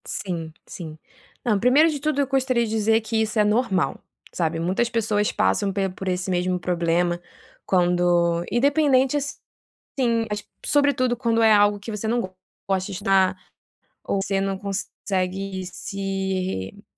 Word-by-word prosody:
Sim 170 -4 -4
sim. 160 -3 -8 0.5
Não, 215 -4 +2
1° 270 +8 +5
de 295 -2 -3
tudo 305 0 -1
eu 275 - 0
gostaria 260 -3 +1
de - - -5
dizer 220 +1 +2
que 220 0 -1
isso 220 0 -1
é - - +6
normal, 210 - +1 0.3
sabe. 165 -1 -1
Muitas 185 +8 0
pessoas 215 -3 +1
passam 95 - +1
pe 195 0 -1
por 190 +1 -8
esse 180 0 -1
mesmo 180 0 0
problema 175 0 0 0.5
quando, 175 -2 +2
independente 275 +1 +3
assim, 250 -4 -4
mas 210 0 -3 0.2
sobretudo 280 -4 +2
quando 230 -2 +1
é 220 -1 +6
algo 205 0 +4
que 215 +3 -7
você 210 +1 -4
não 235 +2 +1 0.5
gosta 190 -1 0
de 200 - -6
estudar 190 -1 +2 0.7
ou 200 - -1
você 195 0 0
não 195 0 -1
consegue 195 -1 -3
se 190 - -3
re 205 - -17
200 Hz, 150 wpm, -23 LUFS, 185-230 Hz, 0.7 s, é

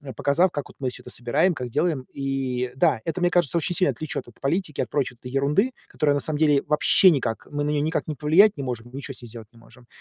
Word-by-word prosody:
показав, 170 +6 +2
как 145 -3 -5
вот - - -16
мы 130 -2 -1
всё - - -10
это - - -10
собираем, 145 +10 +1
как 125 -4 -5
делаем. 145 0 0
И, 130 -2 -2
да, 125 -3 +2
это, 165 +6 -3
мне 175 0 +3
кажется, 175 -2 +2
очень 170 +2 -1
сильно 185 - +2
отвлечёт 155 -5 -5
от 120 - -17
политики, 155 +2 -2
от - - -3
прочей 135 -4 -2
ерунды, 140 - +1 0.2
которая 145 -2 +1
на 145 - +1
самом 150 +1 -3
деле 150 -3 +4
вообще 150 +5 +5
никак 125 - -1
мы 145 0 -2
на 145 - -1
неё 145 - +1
никак 160 +3 -1
ни 155 - -2
повлиять 165 +9 +4
не 140 - -4
можем, 120 -2 -5
ничё 135 +1 -6
с 125 - -13
ней 120 - -10
сделать 115 -1 -10
не 115 - -18
можем. 120 +1 -19
145 Hz, 250 wpm, -24 LUFS, 125-160 Hz, 0.2 s, вообще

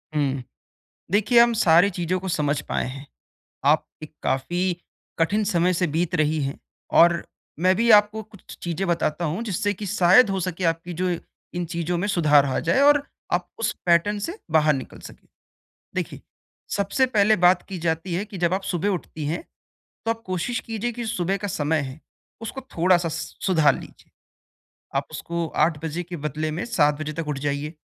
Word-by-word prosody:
हुँ। 135 -3 0 0.7
देखिये 220 +4 +5
हम 235 0 +6
सारी 180 -3 +5
चीज़ों 180 0 -1
को 190 - -5
समझ 150 -4 0
पाए - - -1
हैं। 135 +2 -8 0.6
आप 150 +2 +4 0.2
एक 155 - -10
काफ़ी 175 +7 -1 0.6
कठिन 205 +6 +2
समय 180 -3 +2
से 180 0 +1
बीत 175 +1 0
रही 155 -1 +1
हैं 135 0 -4 0.4
और 170 0 +5 0.4
मैं 185 +2 +4
भी 235 +4 +1
आपको 210 +1 +5
कुछ 215 -2 -14
चीज़ें 175 +3 -2
बताता 170 -1 0
हूँ 165 +7 -2
जिससे 205 -1 -1
कि 205 +2 -7
शायद 195 +3 +5
हो 195 -1 -1
सके 180 0 -3
आपकी 165 +1 -1
जो 185 - +1 0.5
इन 175 0 -1
चीज़ों 170 +1 -2
में 180 +4 -1
सुधार 150 -7 +4
आ 135 - 0
जाए 275 - +4
और 290 0 +5 0.3
आप - - 0
उस - - +1
पैटर्न 180 +4 +3
से 335 - -4
बाहर 155 -1 +4
निकल 135 -2 -6
सकें। - - -13 0.7
देखिये, - - -4 0.6
सबसे 200 +6 +2
पहले 215 -3 +3
बात 180 0 +5
की 190 -2 -5
जाती 165 +1 -2
है 185 +4 -1
कि 210 -3 -9
जब 175 +1 +1
आप 190 - -2
सुबह 180 +1 -1
उठती 165 -5 -4
हैं, 160 - -2 0.6
तो 225 - +2
आप 225 0 -5
कोशिश 185 +6 -2
कीजिये 225 +1 -3
कि 240 0 -5
सुबह 195 -4 -1
का 205 +1 -4
समय 155 -3 0
है 135 +1 -7 0.4
उसको 245 +4 -6 0.2
थोड़ा-सा 175 0 +3
स 160 +1 -6
सुधार 165 -6 +4
लीजिये। - - -13 0.9
आप - - -2
उसको 170 -1 -3 0.2
8 160 -2 -3
बजे 165 +3 -3
के 175 +1 -7
बदले 155 +1 -3
में 165 +3 -3
7 150 -10 +2
बजे 155 0 -4
तक 165 0 -4
उठ 150 -2 -2
जाइये। 145 +2 -2
175 Hz, 185 wpm, -24 LUFS, 155-205 Hz, 0.9 s, हम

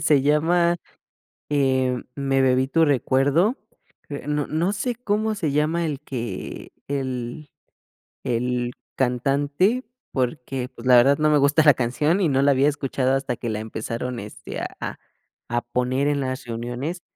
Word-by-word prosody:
Se 145 -3 +4
llama 170 +4 +3 0.7
eh, 130 -3 +1
"Me 135 -1 +1
bebí 130 0 +3
tu 165 +2 +4
recuerdo". 145 - +2 0.5
Eh, 145 -1 -6
no 150 -1 0
no 170 +5 0
sé 240 +5 -2
cómo 220 -2 -1
se 175 -8 -1
llama 155 +4 +1
el 150 -4 -3
que 115 -7 -6 0.2
el 130 +1 -4 0.7
el 125 0 -1 0.2
cantante, 140 - +1 0.3
porque 130 -1 -2
pues, 120 0 -8
la 125 - +7
verdad 135 +4 +6
no 155 0 +3
me 150 - +4
gusta 140 +3 +4
la 150 -1 +8
canción 150 +10 +1
y 175 - +3
no 135 -1 +2
la 140 +1 +5
había 140 +2 +4
escuchado 135 -2 0
hasta 135 -2 -1
que 120 - -5
la 105 -1 -2
empezaron 115 +3 -4
este 105 +1 -7 0.2
a - - -5 0.5
a 120 +1 0
poner 125 +3 0
en 145 -1 +1
las 130 -1 -3
reuniones. 120 +9 -4
135 Hz, 155 wpm, -23 LUFS, 125-150 Hz, 0.7 s, la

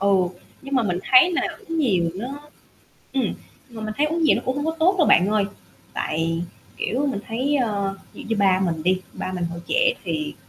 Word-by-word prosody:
Ừ, 200 0 +4 0.5
nhưng 275 0 -4
mà 255 - +3
mình 180 -4 0
thấy 270 +8 +7
là - - +1 0.2
uống 330 -7 -5
nhiều 185 - +2
nó 215 +6 -4 0.9
ừm, 260 -6 0 0.4
mà 230 -2 -9
mình 215 0 -3
thấy 295 - +3
uống 325 +2 -1
nhiều - - +5
nó - - -2
cũng 260 - 0
hông 290 +2 -2
có 320 - +1
tốt 370 +4 +4
đâu 330 - +4
bạn 180 - +6
ơi, 210 -2 +2 0.5
tại, 165 +1 -1 0.4
kiểu, 275 +5 0
mình 250 -7 -1
thấy, 260 +6 0
ờ, 200 -6 0 0.2
dị - - -9
như 225 - -1
ba 190 -2 +4
mình 165 -4 -1
đi, 185 +1 +2
ba 185 - -4
mình 180 -1 -2
hồi 170 0 -5
trẻ - - +3
thì 305 0 -3
225 Hz, 220 wpm, -23 LUFS, 185-290 Hz, 0.9 s, thấy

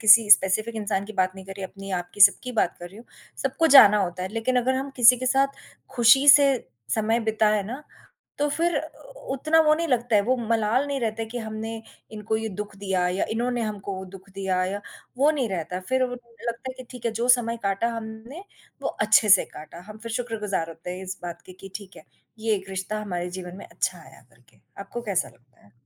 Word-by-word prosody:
किसी 220 -1 +7
स्पेसिफिक 215 +4 +4
इंसान 205 -2 -2
की 220 - -9
बात 185 -1 0
नहीं 190 - -10
कर 195 - -7
रही, 195 - -6
अपनी, 195 +1 -9
आपकी 180 +2 -5
सबकी 205 +5 +5
बात 195 -6 0
कर 175 - -8
रही 195 - -16
हूँ। 230 - -13 0.4
सबको 270 +4 +1
जाना 210 -5 +8
होता 180 0 -4
है 185 - -3
लेकिन 230 +3 -1
अगर 260 +2 0
हम 270 +1 -3
किसी 245 0 +7
के 255 - -3
साथ 270 +2 +3 0.5
ख़ुशी 245 +4 +6
से 280 -1 +8 0.4
समय 225 +2 +1
बिताए 215 -1 +1
ना 250 +9 -7 0.6
तो 295 - +1
फ़िर 335 +4 0
उ - - -12 0.2
उतना 310 +4 +2
वो 305 -1 +4
नहीं 335 +2 -2
लगता 240 -3 +1
है। 205 - +4
वो 255 +5 +1
मलाल 230 +2 0
नहीं 280 -1 -2
रहता 225 -1 -2
है 225 - -5
कि 240 +1 -5
हमने 220 0 -5 0.4
इनको 215 +1 -2
ये 220 0 -3
दुःख 210 -1 -7
दिया 190 -2 -1
या 185 +2 -1
इन्होंने 240 +1 -1
हमको 205 -2 -4
वो 190 - -6
दुःख 195 +1 -13
दिया 190 -2 -1
या 200 +2 -3 0.4
वो 285 +3 +5
नहीं 275 -6 -1
रहता। 180 -1 -4
फ़िर 260 0 +1
वो 245 -1 -4
लगता 235 +1 -7
है - - -10
कि 255 - -8
ठीक 250 -2 -11
है 230 - -1
जो 245 - 0
समय 240 -2 +3
काटा 200 +3 0
हमने 225 +8 -8 0.4
वो - - -1
अच्छे 215 0 +4
से 195 -2 +7
काटा। 155 +3 -11
हम 215 - -10
फ़िर 230 +1 -7
शुक्रगुज़ार 210 -8 -3
होते 165 +2 -9
हैं 190 - -8
इस 190 +1 -6
बात 175 -1 -7
के 185 - -11
कि 195 +1 -13
ठीक 200 -2 -14
है - - -14 0.3
ये 220 0 0
एक 190 0 -9
रिश्ता 190 +3 -4
हमारे 180 -3 -4
जीवन 180 0 -8
में - - -10
अच्छा 185 -2 -3
आया 135 -5 -16
करके। 120 +1 -27 0.2
आपको 240 +4 -6
कैसा 200 -5 -1
लगता 125 -1 -26
है? 100 - -25
220 Hz, 225 wpm, -24 LUFS, 190-245 Hz, 0.6 s, जाना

